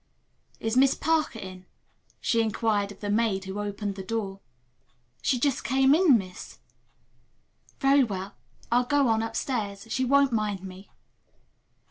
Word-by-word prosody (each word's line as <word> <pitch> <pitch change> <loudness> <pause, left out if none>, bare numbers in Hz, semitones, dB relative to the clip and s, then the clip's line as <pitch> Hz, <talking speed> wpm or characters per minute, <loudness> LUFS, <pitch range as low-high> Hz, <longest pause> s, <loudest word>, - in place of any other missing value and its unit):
"Is 225 +1 -2
Miss 265 +1 +5
Parker 315 -6 0
in?" 185 -3 -9 0.5
she 230 -2 +1
inquired 215 -2 0
of 200 - -14
the 205 - -3
maid 210 -3 +1
who 190 +2 -5
opened 205 0 -3
the 195 - -7
door. 195 -1 -4 0.8
"She 260 - +1
just 270 +1 0
came 270 +1 +4
in, 315 -6 +6
miss." 185 -3 -8 1.2
"Very 275 0 +5
well. 195 -4 -4 0.4
I'll 245 +1 +3
go 285 0 +2
on 220 0 +2
upstairs. 225 -3 -3
She 260 - 0
won't 280 +1 +4
mind 210 -4 -1
me." 190 +1 -10
225 Hz, 140 wpm, -27 LUFS, 200-260 Hz, 1.2 s, in